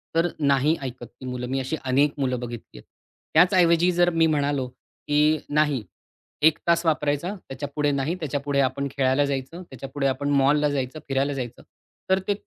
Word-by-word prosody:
तर 165 +1 +3
नाही 140 +1 +3
ऐकतर 130 -2 -6
ती 120 +2 -14
मुलं. 125 -1 -4
मी 135 +2 -1
अशी 135 +4 -2
अनेक 140 +3 +3
मुलं 130 -2 0
बघितली 120 - -8
आहेत. - - -13 0.5
त्याचऐवजी 175 -1 +5
जर 175 0 +3
मी 165 -1 +3
म्हणालो, 145 -3 0
की 150 +4 0
नाही 150 -5 +1 0.6
1 160 - +3
तास 170 0 +3
वापरायचा 150 +3 0
त्याच्यापुढे 145 -3 -3
नाही. 140 +4 -1
त्याच्यापुढे 145 -2 -2
आपण 140 +1 0
खेळायला 135 +1 +3
जायचं. 140 +5 -4
त्याच्यापुढे 135 -1 -4
आपण 135 +2 -1
मॉलला 145 +2 +3
जायचं, 140 +1 -3
फिरायला 135 +1 0
जायचं. 125 -3 -6 0.5
तर 190 0 +4
ते 205 - +3
140 Hz, 165 wpm, -24 LUFS, 130-155 Hz, 0.6 s, त्याचऐवजी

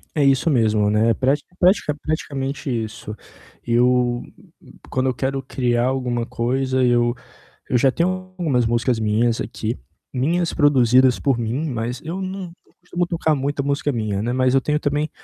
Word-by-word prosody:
É 150 - +2
isso 135 +3 +3
mesmo, 110 -6 +2
né, 110 +2 +3
pratica 140 +8 -1
pratica 180 -5 +3
praticamente 140 -2 -3
isso. 110 -3 -4 0.5
Eu, 120 0 +2 0.7
quando 130 0 0
eu - - 0
quero 135 +2 -2
criar 120 -2 0
alguma 125 -3 -1
coisa, 130 +2 0
eu 120 -1 +3 0.6
eu 125 - +3
já 130 +2 +4
tenho 170 +5 +1 0.3
algumas 140 -9 +1
músicas 120 +1 +1
minhas 110 +2 +1
aqui, 110 +1 -4 0.4
minhas 165 +7 0
produzidas 130 -4 +4
por 135 -4 +1
mim, 120 +7 -2
mas 120 +1 -3
eu 170 +4 -4
não 190 -1 -5 0.2
não - - -29
costumo 175 0 -2
tocar 165 -2 +1
muita 140 +1 -2
música 140 +1 0
minha, 105 -5 -2
né. 120 +3 -1
Mas 130 0 +2
eu 135 - +4
tenho 150 +2 0
também 150 +1 -1
130 Hz, 160 wpm, -21 LUFS, 120-145 Hz, 0.7 s, já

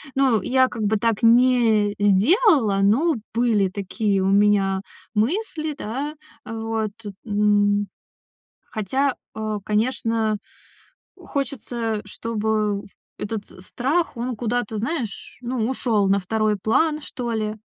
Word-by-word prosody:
Ну, 260 -6 +3
я 260 0 +3
как 225 -3 -5
бы 210 +1 +2
так 230 +1 0
не 230 -3 +4
сделала, 215 - +4
но 280 +11 +3 0.2
были 225 -4 +2
такие 200 +1 -1
у 190 - +1
меня 195 -1 +3 0.3
мысли, 310 - -1
да. 275 +5 -4 0.3
Э, 225 - -6
вот, 225 -1 -2 0.3
м. 205 -1 +2 0.9
Хотя, 260 +6 0 0.2
э, 215 -1 -3
конечно, 220 0 0 0.8
хочется, 235 -5 -3
чтобы 215 -1 -1 0.4
этот 210 0 -4 0.2
страх, 280 - -1
он 240 0 -3
куда-то, 235 -1 -2
знаешь, 240 -3 -4
ну, 240 -2 -1
ушёл 220 -6 +1
на 195 +1 +3
второй 215 +2 0
план, 300 - +1
что 245 -5 -5
ли. 215 -1 -2
220 Hz, 115 wpm, -23 LUFS, 205-250 Hz, 0.9 s, не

